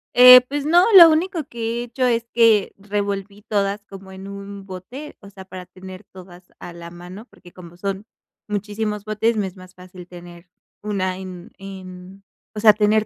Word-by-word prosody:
Eh, 250 Hz, 0 st, +10 dB
pues 285 Hz, +1 st, -4 dB
no, 345 Hz, +3 st, +4 dB
lo 340 Hz, -3 st, +11 dB
único 330 Hz, +1 st, 0 dB
que 235 Hz, -2 st, -4 dB
he -, -, -4 dB
hecho 245 Hz, +2 st, -3 dB
es 235 Hz, -2 st, 0 dB
que 225 Hz, -4 st, +3 dB
revolví 200 Hz, 0 st, -4 dB
todas 200 Hz, 0 st, -2 dB
como 195 Hz, -1 st, -13 dB
en 190 Hz, +1 st, -10 dB
un 200 Hz, 0 st, -9 dB
bote, 220 Hz, +11 st, -10 dB
o 200 Hz, -, -14 dB
sea, 190 Hz, -1 st, -13 dB
para 185 Hz, -1 st, -10 dB
tener 185 Hz, +1 st, -12 dB
todas 180 Hz, -1 st, -15 dB, 0.2 s
a 175 Hz, -, -10 dB
la 170 Hz, 0 st, -10 dB
mano, 180 Hz, +5 st, -11 dB
porque 180 Hz, -7 st, -19 dB
como 175 Hz, -1 st, -14 dB
son 195 Hz, +2 st, -5 dB, 0.4 s
muchísimos 210 Hz, 0 st, -4 dB
botes, 215 Hz, +1 st, -1 dB
me 200 Hz, -, -1 dB
es 190 Hz, +1 st, -12 dB
más 185 Hz, 0 st, -15 dB
fácil 180 Hz, -1 st, -13 dB
tener 175 Hz, 0 st, -14 dB, 0.3 s
una 185 Hz, -3 st, -3 dB
en 185 Hz, -2 st, -10 dB
en, 190 Hz, 0 st, -11 dB, 0.3 s
o 210 Hz, -, -4 dB
sea, 215 Hz, -1 st, +7 dB
tener 215 Hz, +1 st, +1 dB
200 Hz, 185 wpm, -21 LUFS, 185-220 Hz, 0.4 s, lo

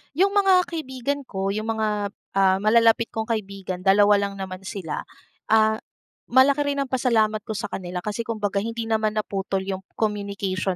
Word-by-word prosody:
Yung 390 Hz, +5 st, +3 dB
mga 390 Hz, -3 st, +5 dB
kaibigan 285 Hz, -3 st, -3 dB
ko, 195 Hz, 0 st, -2 dB
yung 215 Hz, +2 st, -3 dB
mga, 210 Hz, -2 st, -1 dB, 0.2 s
ah, 190 Hz, -1 st, +4 dB
malalapit 230 Hz, +1 st, +4 dB
kong 220 Hz, 0 st, -3 dB
kaibigan, 195 Hz, -4 st, -4 dB
dalawa 205 Hz, +2 st, +5 dB
lang 200 Hz, -1 st, -2 dB
naman 190 Hz, 0 st, -6 dB
sila. 190 Hz, -6 st, -5 dB, 0.5 s
Ah, 220 Hz, 0 st, +4 dB, 0.5 s
malaki 275 Hz, +3 st, +4 dB
rin 280 Hz, -, -2 dB
ang 265 Hz, -, -11 dB
pasalamat 220 Hz, -4 st, +2 dB
ko 220 Hz, -, -3 dB
sa 200 Hz, -, -4 dB
kanila 180 Hz, -1 st, -5 dB
kasi 210 Hz, +2 st, -3 dB
kumbaga 210 Hz, -3 st, -1 dB
hindi 230 Hz, +2 st, -3 dB
naman 220 Hz, -1 st, 0 dB
naputol 195 Hz, -2 st, -2 dB
yung 190 Hz, -1 st, -3 dB, 0.2 s
communication 200 Hz, -3 st, -2 dB
215 Hz, 160 wpm, -24 LUFS, 195-230 Hz, 0.5 s, mga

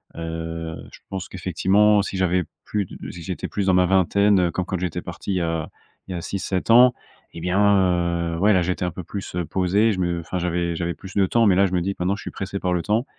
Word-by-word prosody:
Heu, 80 Hz, 0 st, -5 dB, 0.2 s
je -, -, -14 dB
pense 95 Hz, -1 st, -5 dB
qu'effectivement, 95 Hz, +3 st, +3 dB
si 100 Hz, -1 st, -4 dB
j'avais 90 Hz, -1 st, +2 dB, 0.2 s
plus 105 Hz, -2 st, -1 dB
de -, -, -9 dB
si 85 Hz, -, -10 dB
j'étais 90 Hz, +2 st, -4 dB
plus 100 Hz, -2 st, -2 dB
dans 95 Hz, -, +4 dB
ma 90 Hz, 0 st, +4 dB
vingtaine, 95 Hz, +2 st, +3 dB
heu, -, -, -3 dB
comme 90 Hz, +2 st, -2 dB
quand 95 Hz, -1 st, -3 dB
j'étais 90 Hz, -2 st, -3 dB
parti 100 Hz, -, -5 dB
il -, -, -1 dB
y 90 Hz, -, 0 dB
a 80 Hz, -2 st, -2 dB, 0.4 s
il 95 Hz, -, -5 dB
y -, -, -3 dB
a -, -, -4 dB
6-7 95 Hz, +2 st, -2 dB
ans 125 Hz, +2 st, +7 dB, 0.4 s
et 85 Hz, -, -8 dB
bien, 90 Hz, +3 st, 0 dB, 0.8 s
heu, -, -, -4 dB
ouais 105 Hz, +3 st, +4 dB
là 90 Hz, -2 st, +3 dB
j'étais 90 Hz, +1 st, -1 dB
un -, -, 0 dB
peu 90 Hz, +3 st, -7 dB
plus, 95 Hz, +2 st, -7 dB
heu, 90 Hz, -1 st, -1 dB
posé 95 Hz, +6 st, +2 dB
je 95 Hz, -, -3 dB
me 85 Hz, -2 st, -1 dB
enfin, 90 Hz, +2 st, -4 dB
j'avais 85 Hz, -1 st, -1 dB
j'avais 85 Hz, 0 st, -2 dB
plus 95 Hz, +2 st, -11 dB
de 100 Hz, -1 st, +4 dB
temps 115 Hz, +4 st, +3 dB
mais, 100 Hz, -, +5 dB
là, 100 Hz, +1 st, +4 dB
je 95 Hz, -, -6 dB
me 90 Hz, -, +2 dB
dis 100 Hz, +3 st, -1 dB
maintenant 90 Hz, +2 st, +1 dB
je 105 Hz, -, -9 dB
suis -, -, -6 dB
pressé 95 Hz, 0 st, -5 dB
par 90 Hz, -1 st, 0 dB
le 90 Hz, -, 0 dB
temps 110 Hz, +7 st, 0 dB
90 Hz, 265 wpm, -23 LUFS, 85-100 Hz, 0.8 s, ans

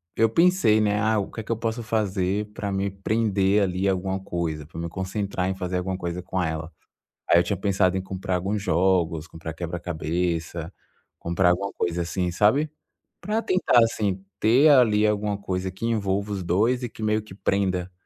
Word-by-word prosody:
eu 115 Hz, -1 st, +3 dB
pensei, 165 Hz, -, +4 dB
né: 105 Hz, 0 st, +1 dB
"Ah, 110 Hz, 0 st, +2 dB
o 100 Hz, -, -3 dB
que 110 Hz, -, -6 dB
que 115 Hz, -, -6 dB
eu 115 Hz, -, 0 dB
posso 115 Hz, +1 st, -3 dB
fazer 105 Hz, -2 st, 0 dB
pra 100 Hz, -2 st, -4 dB
me 100 Hz, +1 st, -1 dB
prender 100 Hz, 0 st, +1 dB
ali 95 Hz, 0 st, 0 dB
alguma 95 Hz, 0 st, 0 dB
coisa, 85 Hz, -5 st, -3 dB
pra 80 Hz, +1 st, -9 dB
me 85 Hz, 0 st, -3 dB
concentrar 95 Hz, 0 st, -2 dB
em 95 Hz, -, -2 dB
fazer 90 Hz, -1 st, -3 dB
alguma 95 Hz, +1 st, -2 dB
coisa 85 Hz, -1 st, -4 dB
com 95 Hz, +1 st, -2 dB
ela". 80 Hz, 0 st, -3 dB, 0.6 s
Aí 85 Hz, -, +7 dB
eu -, -, +3 dB
tinha 100 Hz, -, -2 dB
pensado 95 Hz, -1 st, +1 dB
em 95 Hz, -, -1 dB
comprar 95 Hz, -1 st, -3 dB
alguns 100 Hz, +3 st, -1 dB
jogos, 85 Hz, -4 st, +1 dB
comprar 80 Hz, -1 st, -7 dB
quebra-cabeça, 85 Hz, 0 st, -3 dB, 0.5 s
comprar 85 Hz, +2 st, +2 dB
alguma 100 Hz, +3 st, -1 dB
coisa 85 Hz, 0 st, -1 dB
assim, 90 Hz, +1 st, -1 dB
sabe? 120 Hz, -, +3 dB, 0.5 s
Pra 215 Hz, +2 st, -1 dB
tentar 185 Hz, -, +3 dB
assim, 100 Hz, -4 st, -1 dB, 0.2 s
ter 125 Hz, +8 st, +5 dB
ali 110 Hz, -7 st, +5 dB
alguma 105 Hz, -1 st, 0 dB
coisa 95 Hz, -2 st, -3 dB
que 95 Hz, +5 st, -6 dB
envolva 100 Hz, -2 st, -1 dB
os 95 Hz, -2 st, -3 dB
dois 110 Hz, +9 st, +1 dB
e 120 Hz, -, -3 dB
que 110 Hz, -, -12 dB
meio 110 Hz, 0 st, +1 dB
que 105 Hz, -3 st, -13 dB
prenda 95 Hz, -2 st, 0 dB
95 Hz, 185 wpm, -25 LUFS, 90-105 Hz, 0.6 s, Aí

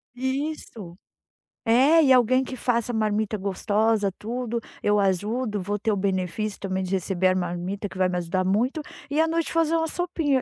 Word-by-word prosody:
Isso. 260 Hz, -, -4 dB, 0.7 s
É, 270 Hz, +8 st, +5 dB
e 265 Hz, -, +4 dB
alguém 255 Hz, +1 st, +5 dB
que 260 Hz, 0 st, -7 dB
faça 235 Hz, -1 st, 0 dB
marmita 215 Hz, -1 st, 0 dB
gostosa, 205 Hz, +1 st, +1 dB
tudo, 235 Hz, +1 st, -3 dB, 0.2 s
eu 205 Hz, 0 st, +3 dB
ajudo, 205 Hz, +3 st, 0 dB
vou 205 Hz, +3 st, -2 dB
ter 220 Hz, +1 st, 0 dB
o -, -, +1 dB
benefício 195 Hz, +1 st, -2 dB
também 190 Hz, -1 st, -2 dB
de 185 Hz, -, -5 dB
receber 185 Hz, -1 st, +1 dB
a 185 Hz, -, +3 dB
marmita 180 Hz, +3 st, -3 dB
que 190 Hz, -, -11 dB
vai 185 Hz, -1 st, +2 dB
me 180 Hz, -, -1 dB
ajudar 175 Hz, +2 st, -1 dB
muito 230 Hz, +11 st, +1 dB, 0.3 s
e 300 Hz, +2 st, +2 dB
à -, -, +4 dB
noite 330 Hz, 0 st, 0 dB
fazer 330 Hz, 0 st, +2 dB
uma 325 Hz, 0 st, 0 dB
sopinha, 320 Hz, -6 st, 0 dB
215 Hz, 180 wpm, -25 LUFS, 190-255 Hz, 0.7 s, É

